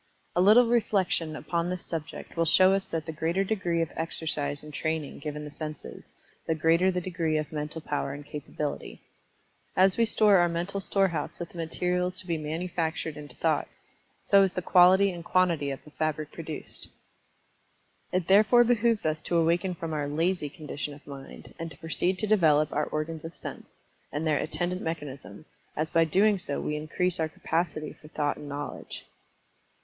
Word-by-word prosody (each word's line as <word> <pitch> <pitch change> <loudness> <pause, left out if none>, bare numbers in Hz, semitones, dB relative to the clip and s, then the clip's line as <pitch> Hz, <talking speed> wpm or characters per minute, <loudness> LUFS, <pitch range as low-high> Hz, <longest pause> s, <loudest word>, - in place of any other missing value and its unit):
A 175 - +4
little 215 +6 +7
reflection 195 -8 +1
upon 170 +3 -2
this 180 -1 -4
subject 160 -2 -6
will 165 0 +2
show 185 +4 +6
us 195 0 0
that 160 -2 -3
the 160 - -4
greater 165 +5 0
degree 180 -5 0
of 165 - -6
exercise 155 -3 -2
and 150 0 -10
training 160 -1 -2
given 150 +1 -5
the 150 - -8
senses, 155 0 -8 0.4
the 160 - +1
greater 165 +4 +3
the 180 -1 0
degree 170 -3 -1
of 155 -1 -3
mental 150 +1 -4
power 145 -2 -2
and 140 +1 -8
capability. 150 0 -5 0.8
As 190 0 +5
we 230 - +4
store 210 -2 +5
our 175 -1 +4
mental 175 +4 -2
storehouse 195 -4 0
with 170 -1 -6
the 175 - -10
materials 180 +2 -1
to 185 - -5
be 170 -2 -1
manufactured 160 0 -2
into 150 -1 -9
thought, - - +1 0.6
so 200 - +6
is 195 -2 +2
the 180 - -3
quality 185 +3 +6
and 170 -2 -7
quantity 170 -5 +2
of 135 0 -5
the 150 - -15
fabric 155 -1 -2
produced. 160 -2 -7 1.2
It 180 -1 0
therefore 215 +5 +6
behooves 235 -3 +2
us 155 0 0
to 170 - 0
awaken 170 +2 +2
from 165 -1 -5
our 145 -2 -1
"lazy" 160 +1 0
condition 145 0 -6
of 145 - -17
mind, 140 -1 -10
and 165 0 -4
to 140 - -12
proceed 175 +3 -1
to 195 - -1
develop 155 -8 +4
our 150 - +1
organs 155 +1 -4
of 165 +1 -8
sense, - - -8 0.4
and 150 +2 -2
their 155 -2 +2
attendant 175 +4 -2
mechanism, 150 -2 -6 0.3
as 155 +1 -1
by 165 0 +4
doing 195 +5 +3
so 145 -5 -3
we 150 - -2
increase 165 +4 -1
our 160 -1 0
capacity 160 -1 -2
for 155 - -16
thought 150 -1 -1
and 145 - -8
knowledge. 145 +1 -6
165 Hz, 180 wpm, -28 LUFS, 150-180 Hz, 1.2 s, little